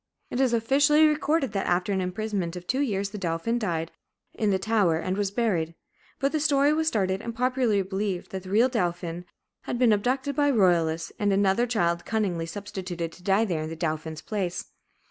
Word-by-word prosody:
It 245 Hz, -, -2 dB
is 260 Hz, -3 st, +3 dB
officially 280 Hz, +7 st, +4 dB
recorded 300 Hz, -2 st, +1 dB
that 195 Hz, -, -2 dB
after 180 Hz, +3 st, +1 dB
an 190 Hz, -, 0 dB
imprisonment 185 Hz, -2 st, -2 dB
of 180 Hz, 0 st, -8 dB
two 260 Hz, +8 st, -1 dB
years 200 Hz, -7 st, -1 dB
the 210 Hz, -, -6 dB
dauphin 180 Hz, +7 st, -1 dB
died 165 Hz, -6 st, -2 dB, 0.4 s
in 215 Hz, -, 0 dB
the 195 Hz, -, +3 dB
tower 195 Hz, -5 st, +2 dB
and 185 Hz, +3 st, -2 dB
was 200 Hz, -1 st, 0 dB
buried. 190 Hz, -7 st, -1 dB, 0.4 s
But 275 Hz, +1 st, 0 dB
the 310 Hz, -, 0 dB
story 290 Hz, -1 st, +3 dB
was 315 Hz, +1 st, 0 dB
started 195 Hz, -7 st, +1 dB
and 230 Hz, 0 st, -6 dB
popularly 250 Hz, -4 st, +1 dB
believed, 190 Hz, -1 st, -3 dB
that 190 Hz, -, -4 dB
the 185 Hz, -, -10 dB
real 220 Hz, +6 st, +4 dB
dauphin 175 Hz, -6 st, -2 dB, 0.4 s
had -, -, -2 dB
been 240 Hz, -3 st, +4 dB
abducted 260 Hz, +6 st, 0 dB
by 290 Hz, 0 st, +3 dB
the 265 Hz, -, +1 dB
royalists 165 Hz, -4 st, +2 dB
and 205 Hz, -1 st, +2 dB
another 195 Hz, +4 st, +2 dB
child 175 Hz, -7 st, 0 dB
cunningly 190 Hz, -7 st, -1 dB
substituted 180 Hz, -2 st, -5 dB
to 180 Hz, -, -16 dB
die 195 Hz, +4 st, +2 dB
there 170 Hz, -7 st, -2 dB
in 155 Hz, -, -4 dB
the 165 Hz, -, -5 dB
dauphin's 155 Hz, -1 st, -3 dB
place. 185 Hz, -4 st, -3 dB
200 Hz, 200 wpm, -26 LUFS, 175-240 Hz, 0.4 s, officially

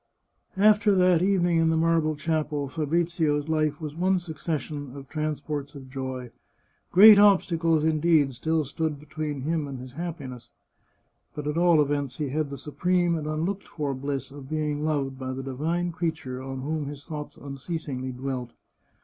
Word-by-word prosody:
After 205 Hz, 0 st, +5 dB
that 180 Hz, -2 st, +4 dB
evening 175 Hz, -3 st, +3 dB
in 165 Hz, 0 st, +3 dB
the 160 Hz, -, +2 dB
marble 160 Hz, -1 st, +2 dB
chapel, 150 Hz, -2 st, -1 dB
Fabrizio's 155 Hz, 0 st, 0 dB
life 155 Hz, -2 st, 0 dB
was 155 Hz, -2 st, -6 dB
one 185 Hz, +3 st, +2 dB
succession 155 Hz, -4 st, -4 dB
of 140 Hz, -1 st, -9 dB
transports 150 Hz, -1 st, -3 dB
of 130 Hz, -2 st, -10 dB
joy. 130 Hz, -2 st, -5 dB, 0.6 s
Great 205 Hz, +2 st, +10 dB
obstacles, 165 Hz, -6 st, +4 dB
indeed, 155 Hz, -3 st, +3 dB
still 155 Hz, +5 st, 0 dB
stood 155 Hz, +1 st, -2 dB
between 150 Hz, -1 st, -5 dB
him 155 Hz, +1 st, -1 dB
and 135 Hz, -2 st, -6 dB
his 125 Hz, 0 st, -9 dB
happiness, 140 Hz, -7 st, -6 dB, 0.9 s
but 150 Hz, -, -5 dB
at 150 Hz, +1 st, -1 dB
all 170 Hz, -1 st, +5 dB
events 145 Hz, -3 st, 0 dB
he 150 Hz, -3 st, -2 dB
had 150 Hz, +1 st, -1 dB
the 140 Hz, -, -6 dB
supreme 175 Hz, +5 st, +1 dB
and 155 Hz, -2 st, -3 dB
unlooked 165 Hz, +6 st, -2 dB
for 145 Hz, -3 st, -3 dB
bliss 135 Hz, 0 st, -4 dB
of 140 Hz, -1 st, -10 dB
being 150 Hz, -1 st, -1 dB
loved 140 Hz, -4 st, -1 dB
by 130 Hz, -1 st, -4 dB
the 135 Hz, +1 st, -5 dB
divine 160 Hz, +7 st, -1 dB
creature 160 Hz, -7 st, -3 dB
on 135 Hz, 0 st, -5 dB
whom 150 Hz, +1 st, -2 dB
his 145 Hz, 0 st, -8 dB
thoughts 150 Hz, -3 st, -7 dB
unceasingly 140 Hz, -2 st, -5 dB
dwelt. 125 Hz, -1 st, -4 dB
150 Hz, 160 wpm, -26 LUFS, 140-165 Hz, 0.9 s, Great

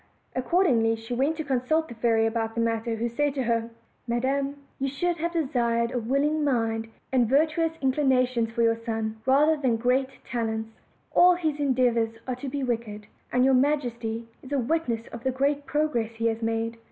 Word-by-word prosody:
Accordingly 255 Hz, -6 st, +2 dB
she 225 Hz, +2 st, -7 dB
went 275 Hz, +6 st, +1 dB
to 315 Hz, -, -2 dB
consult 290 Hz, +4 st, 0 dB
the -, -, -8 dB
fairy 225 Hz, -1 st, +2 dB
about 225 Hz, 0 st, -1 dB
the -, -, -2 dB
matter, 230 Hz, 0 st, 0 dB
who 230 Hz, +2 st, -1 dB
said 285 Hz, +4 st, -1 dB
to 265 Hz, -, 0 dB
her: 230 Hz, -1 st, 0 dB, 0.4 s
"Madam, 270 Hz, +4 st, 0 dB, 0.2 s
you 275 Hz, -, 0 dB
should 340 Hz, +6 st, -1 dB
have 340 Hz, +1 st, -2 dB
desired 235 Hz, -7 st, 0 dB
a 250 Hz, -, -1 dB
willing 280 Hz, +6 st, +1 dB
mind 225 Hz, -5 st, 0 dB, 0.2 s
and 245 Hz, -4 st, +3 dB
virtuous 315 Hz, +4 st, +2 dB
inclinations 255 Hz, -4 st, +2 dB
for 230 Hz, +1 st, 0 dB
your 230 Hz, 0 st, +4 dB
son, 220 Hz, -1 st, -3 dB
rather 295 Hz, +4 st, +5 dB
than 260 Hz, -6 st, +1 dB
great 250 Hz, +3 st, +1 dB, 0.2 s
talents; 220 Hz, -2 st, -2 dB, 0.4 s
all 360 Hz, 0 st, +6 dB
his 315 Hz, -4 st, -2 dB
endeavors 245 Hz, -5 st, +1 dB
are 255 Hz, -, -1 dB
to 270 Hz, +1 st, -5 dB
be 280 Hz, +1 st, -3 dB
wicked, 225 Hz, -4 st, -3 dB, 0.3 s
and 250 Hz, +1 st, +3 dB
your 265 Hz, -, +4 dB
majesty 240 Hz, -5 st, 0 dB
is 265 Hz, -, -13 dB
a 285 Hz, -, +1 dB
witness 245 Hz, -4 st, -1 dB
of 235 Hz, 0 st, -9 dB
the 265 Hz, -, +1 dB
great 280 Hz, +2 st, 0 dB
progress 290 Hz, -7 st, 0 dB
he 230 Hz, 0 st, -3 dB
has 225 Hz, 0 st, 0 dB
made." 225 Hz, 0 st, -1 dB
250 Hz, 185 wpm, -26 LUFS, 230-285 Hz, 0.4 s, all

